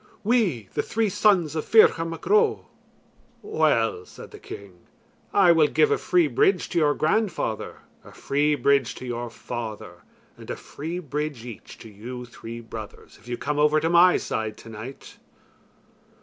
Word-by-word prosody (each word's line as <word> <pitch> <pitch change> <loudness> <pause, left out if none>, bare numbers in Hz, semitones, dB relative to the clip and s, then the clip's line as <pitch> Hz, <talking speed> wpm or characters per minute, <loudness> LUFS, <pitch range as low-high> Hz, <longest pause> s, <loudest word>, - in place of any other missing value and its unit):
"We, 200 - +1
the - - 0
three 225 -1 -1
sons 180 -6 +2
of 155 - -1
Ferchar 190 -7 +5
Mac 165 - -8
Ro." 430 +1 +3 0.8
"Well," 115 - +1
said - - -13
the - - -11
king, 95 -3 -11 0.5
"I 190 -4 +5
will 160 -3 +5
give 440 - +2
a 435 - +3
free 355 -2 +3
bridge 400 +4 +2
to 175 - 0
your 150 -2 +3
grandfather, 160 - -1 0.2
a - - -14
free 145 +2 0
bridge 140 -3 +2
to - - -9
your 120 -1 -4
father, 115 -2 -7 0.4
and - - -13
a - - -2
free 160 +5 -7
bridge 150 -6 -4
each 120 -4 -10
to - - -10
you 120 +5 -8
three 115 -1 -9
brothers, 110 -2 -10
if - - -20
you 120 0 -3
come 145 +1 -2
over 150 +1 +4
to 165 +2 0
my 175 +1 +6
side 110 -1 -3
tonight." 115 +4 -10
150 Hz, 165 wpm, -24 LUFS, 115-180 Hz, 0.8 s, my